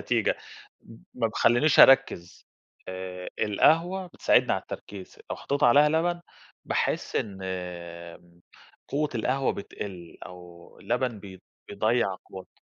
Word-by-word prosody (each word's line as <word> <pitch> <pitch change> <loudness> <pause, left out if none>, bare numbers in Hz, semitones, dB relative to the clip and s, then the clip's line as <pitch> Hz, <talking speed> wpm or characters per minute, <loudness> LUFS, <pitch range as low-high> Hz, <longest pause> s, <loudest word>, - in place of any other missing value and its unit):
نتيجة، - - 0 0.5
م - - -15 0.2
ما - - 0
بيخلنيش 120 +6 +3
أركّز، 135 -10 +4 0.4
آآ، 95 0 -6
القهوة 165 - +2
بتساعدني 175 - +2
على - - -1
التركيز، 100 -2 -10
لو - - -3
حطيت 140 - -3
عليها 145 +5 +6
لبن، 170 +3 0 0.4
باحس - - -1
إن 100 -3 -3 1.5
قوة 150 +2 -1
القهوة 130 +4 0
بتقل، 95 -3 -8
أو 90 -1 -14
اللبن 125 -4 -2
بي 95 -2 -12 0.3
بيضيّع 105 -1 0
قوتها. 95 -1 -13
110 Hz, 115 wpm, -26 LUFS, 95-145 Hz, 1.5 s, عليها